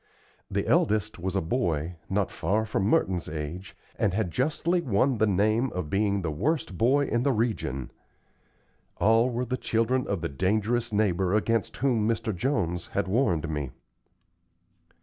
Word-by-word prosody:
The - - -1
eldest 105 -2 +1
was 95 +2 -3
a 95 - +2
boy, 85 - -1 0.2
not 100 0 0
far 110 +3 0
from 100 -3 -1
Merton's 95 - +1
age, 80 +5 -6 0.2
and 95 -3 +1
had 105 -5 -1
justly 160 - 0
won 125 -1 +1
the 110 - +4
name 110 +6 +2
of 85 -5 -4
being 100 -1 +1
the 80 - -1
worst 115 - -1
boy 135 +9 +3
in 120 -3 0
the 140 +2 +2
region. 110 - -2 1.1
All 115 +3 +4
were 125 +1 -2
the 130 +1 -2
children 120 +3 0
of 100 -4 -2
the 80 - -1
dangerous 105 - 0
neighbor 95 -3 +1
against 115 0 0
whom 120 -5 +1
Mr. 115 -2 -1
Jones 90 - -1
had 100 -2 -2
warned 95 - +1
me. 75 -4 -3
105 Hz, 155 wpm, -27 LUFS, 90-120 Hz, 1.1 s, the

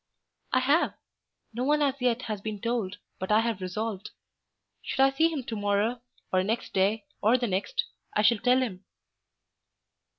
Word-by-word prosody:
"I 255 - +3
have. 285 +6 +2 0.6
No 240 +3 -2
one 295 +2 +3
as 275 -2 +2
yet 250 0 +1
has 215 -4 -4
been 215 -1 -4
told, 220 -4 -2 0.2
but 190 +2 -3
I 215 +1 +6
have 225 -4 -2
resolved. 205 +2 -3 0.7
Should - - -5
I 270 0 +6
see 320 +4 +3
him 290 -5 -3
to 230 -2 -5
morrow, 205 +3 0 0.3
or 185 - +4
next 220 +5 -2
day, 200 +3 +2 0.2
or 220 +4 +5
the 245 - -1
next, 240 - -1 0.3
I 210 - +3
shall 210 +1 +5
tell 250 +2 +4
him." 195 -6 -5
225 Hz, 170 wpm, -28 LUFS, 205-255 Hz, 0.7 s, I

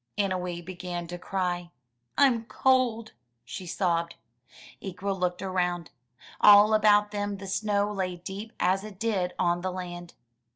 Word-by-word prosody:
Annowee 180 -3 -2
began 175 -1 -5
to 175 0 -6
cry. 175 -2 -2 0.5
"I'm 245 -5 +4
cold!" 240 -3 +1 0.3
she 180 +9 -7
sobbed. 170 -2 0 0.7
Ikwa 195 +1 -4
looked 180 -1 -2
around. 180 -3 -1 0.5
All 210 +1 +8
about 210 -1 +4
them 205 -1 -3
the 195 - -9
snow 205 +1 0
lay 185 -2 -2
deep 195 +5 -7
as 190 +2 +2
it 210 -3 -9
did 195 -6 0
on 175 -1 +1
the 185 +1 -2
land. 175 -1 -7
190 Hz, 135 wpm, -27 LUFS, 180-205 Hz, 0.7 s, All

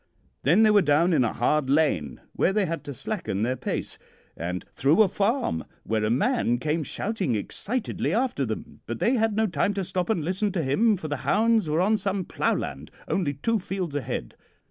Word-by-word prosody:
Then 175 - +4
they 215 - +6
were 205 -1 +6
down 165 +2 +3
in 140 -5 +4
a 115 - +1
hard 135 +3 +1
lane, 135 - +1
where - - +2
they 205 0 +1
had 165 -1 -4
to 145 - -5
slacken 135 - -3
their 125 +3 0
pace, 125 - -4 0.4
and 90 +2 -4
through 155 +10 +5
a - - +3
farm 200 - 0 0.2
where 110 -1 -1
a 105 - +1
man 130 - +2
came 155 +5 -1
shouting 190 - -2
excitedly 215 - -2
after 235 - 0
them; 110 -4 -5
but 115 - -3
they 240 - +2
had 225 -4 +1
no 220 +1 +2
time 195 +2 0
to 195 - -1
stop 185 0 -2
and 175 -9 0
listen 190 +4 0
to 170 - 0
him, 205 +11 +3
for 160 - -6
the 145 -1 -2
hounds 220 - +2
were 155 +3 +2
on 215 +4 +3
some 195 -1 -2
ploughland, - - -2 0.2
only 150 -7 0
two 225 +11 0
fields 185 -4 -4
ahead. 130 -4 -4
170 Hz, 200 wpm, -26 LUFS, 135-210 Hz, 0.4 s, they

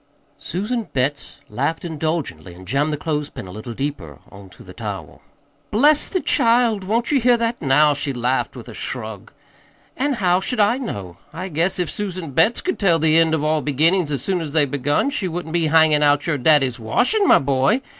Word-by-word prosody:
Susan 210 - -3
Betts 140 +2 -2
laughed 145 +7 -3
indulgently 155 - -4
and 95 +1 -14
jammed 140 +7 0
the 150 - -2
clothespin 150 -6 -4
a 90 - -10
little 110 +4 -8
deeper 100 - -5
on 100 -1 -13
to 90 - -16
the 90 - -12
towel. 100 -9 -7 0.5
"Bless 290 +7 +4
the 370 - -1
child! 230 -3 +2
Won't 230 +7 -1
ye 285 - +3
hear 245 0 +3
that, 235 0 -2
now?" 150 +1 +4
she 145 0 -3
laughed 125 +1 -1
with - - -10
a - - -9
shrug. - - -5 0.6
"An' 285 +2 0
how 185 -6 +2
should 230 +5 -3
I 215 +5 +3
know? 100 - -6
I 185 +3 -6
guess 170 +3 0
if 180 -3 -2
Susan 185 -6 -5
Betts 165 - +2
could 370 - -3
tell 180 -5 +3
the 160 0 +3
end 160 -1 +3
of 155 - -3
all 155 0 +1
the - - -11
beginnin's 165 +4 +2
as 135 -3 -2
soon 185 +2 -1
as 150 -3 -6
they're 155 -2 +3
begun, 145 - 0
she 200 -9 -2
wouldn't 170 -1 -5
be 170 -2 +1
hangin' 155 -1 +4
out 145 -1 +3
your 150 -4 -1
daddy's 135 -3 +3
washin', 250 - +1
my - - +7
boy. 135 - +1
155 Hz, 205 wpm, -20 LUFS, 135-195 Hz, 0.6 s, my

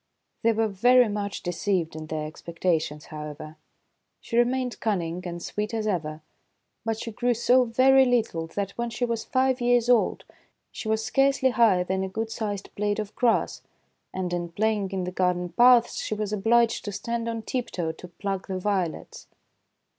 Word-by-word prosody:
They 230 - +4
were 225 0 +1
very 245 +5 +4
much 205 -1 -4
deceived 175 -2 -1
in 155 0 -7
their 155 -1 -3
expectations, 160 -1 -2
how 150 -2 -7
ever. 155 +1 -10 0.6
She 230 - -6
remained 250 +1 +1
cunning 180 -5 -1
and 175 0 -6
sweet 210 +2 -3
as 220 -1 -2
ever, 160 -6 -2 0.6
but 225 -1 -2
she 230 - -5
grew 240 +3 0
so 250 +2 +4
very 265 +3 +5
little 225 -10 0
that, 195 +3 -3
when 235 0 -1
she 235 +2 -1
was 230 -2 -2
five 260 -1 +1
years 240 0 +3
old, 245 -2 +3 0.5
she - - -7
was 220 0 0
scarcely 270 +1 +3
higher 225 -7 +4
than 190 +1 -1
a 190 - -3
good 220 +3 -4
sized 205 -4 -4
blade 205 0 -1
of 215 -1 -4
grass; 240 -3 +1 0.5
and, 185 -1 -3
in 175 -1 -2
play 220 +6 +1
ing 200 -3 -3
in 190 -1 -3
the 180 - -3
garden 180 -1 0
paths, 240 +3 +5
she 215 - -3
was 210 0 -3
obliged 230 +3 +2
to 205 - -3
stand 230 +3 -3
on 225 -1 -4
tiptoe 190 -10 -3
to 160 +3 -11
pluck 195 +1 -4
the 190 -1 -3
violets. 185 -4 -3
210 Hz, 180 wpm, -26 LUFS, 180-235 Hz, 0.6 s, very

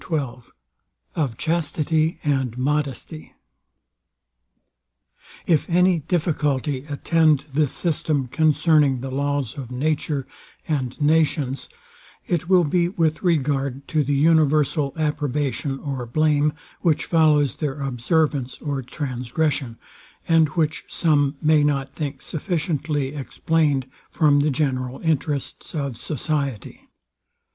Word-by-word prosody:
XII 135 -7 -2 0.7
OF 135 -8 -1
CHASTITY 160 0 0
AND 135 -5 0
MODESTY 150 +3 -3 2.1
If 160 -1 +2
any 180 0 +4
difficulty 145 -5 -1
attend 155 0 +2
this 150 -1 +2
system 155 -4 0
concerning 150 -1 +3
the 135 0 -5
laws 140 -3 -1
of 125 -3 -7
nature 145 +1 -1 0.4
and 130 -4 -2
nations, 150 -3 +1 0.6
it 175 -1 -1
will 185 -2 +6
be 170 +3 +1
with 165 -5 0
regard 140 -5 0
to 155 -2 +2
the 145 +1 0
universal 150 -1 +3
approbation 145 -2 -1
or 135 -4 -5
blame, 150 +3 +2 0.3
which 160 -4 +1
follows 150 -5 +3
their 145 -2 -3
observance 135 +1 0
or 140 -3 -3
transgression, 130 0 -2 0.5
and 165 -1 +5
which 155 -1 -1
some 145 -3 +1
may 155 -1 +4
not 140 -2 0
think 140 -3 -5
sufficiently 150 -4 -2
explained 145 0 0 0.2
from 145 -3 +3
the 145 +2 +2
general 130 -2 -1
interests 150 -1 -2
of 140 -5 -2
society. 140 -1 -4
145 Hz, 105 wpm, -23 LUFS, 135-155 Hz, 2.1 s, will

